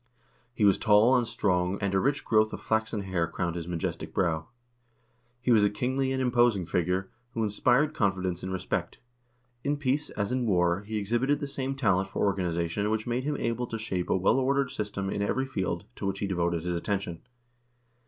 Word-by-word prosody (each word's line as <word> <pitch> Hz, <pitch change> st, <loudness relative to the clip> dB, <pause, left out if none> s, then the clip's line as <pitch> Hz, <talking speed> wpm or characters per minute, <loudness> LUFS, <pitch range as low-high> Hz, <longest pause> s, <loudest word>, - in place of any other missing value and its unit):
He 115 Hz, -3 st, +1 dB
was 100 Hz, -, +5 dB
tall 110 Hz, +3 st, +5 dB
and 120 Hz, -2 st, +2 dB
strong, 90 Hz, -2 st, 0 dB
and 100 Hz, -2 st, -1 dB
a 95 Hz, -, +3 dB
rich 140 Hz, +6 st, 0 dB
growth 110 Hz, -1 st, +3 dB
of -, -, -4 dB
flaxen 110 Hz, -1 st, -1 dB
hair 95 Hz, -4 st, -1 dB
crowned 85 Hz, +1 st, -3 dB
his 85 Hz, -1 st, -5 dB
majestic 85 Hz, -2 st, -4 dB
brow. 80 Hz, -4 st, 0 dB, 0.9 s
He 125 Hz, 0 st, 0 dB
was 110 Hz, -3 st, +6 dB
a 105 Hz, -, +4 dB
kingly 130 Hz, +5 st, -1 dB
and 130 Hz, -, -1 dB
imposing 120 Hz, -6 st, +3 dB
figure, 90 Hz, +3 st, -1 dB, 0.2 s
who 115 Hz, -, 0 dB
inspired 125 Hz, +8 st, +2 dB
confidence 95 Hz, -, 0 dB
and 95 Hz, -, -4 dB
respect. 95 Hz, -, -3 dB, 0.7 s
In 145 Hz, +1 st, 0 dB
peace, 145 Hz, +1 st, 0 dB
as 100 Hz, +2 st, -3 dB
in 125 Hz, -2 st, 0 dB
war, 90 Hz, -2 st, +2 dB
he 110 Hz, 0 st, -2 dB
exhibited 120 Hz, +8 st, +1 dB
the 145 Hz, -, -3 dB
same 135 Hz, 0 st, -3 dB
talent 100 Hz, -7 st, +1 dB
for -, -, 0 dB
organization 90 Hz, 0 st, 0 dB
which 110 Hz, 0 st, -1 dB
made 120 Hz, +2 st, -1 dB
him 150 Hz, 0 st, -1 dB
able 115 Hz, +1 st, -1 dB
to 115 Hz, -, -4 dB
shape 95 Hz, -5 st, -3 dB
a -, -, +3 dB
well 95 Hz, +7 st, +3 dB
ordered 135 Hz, 0 st, +1 dB
system 105 Hz, -5 st, -3 dB
in 100 Hz, -, -2 dB
every 130 Hz, +6 st, 0 dB
field 95 Hz, -9 st, -3 dB
to -, -, -3 dB
which 95 Hz, 0 st, -1 dB
he 100 Hz, -, -2 dB
devoted 85 Hz, -3 st, 0 dB
his 90 Hz, 0 st, -1 dB
attention. 90 Hz, -1 st, -3 dB
105 Hz, 195 wpm, -28 LUFS, 95-125 Hz, 0.9 s, was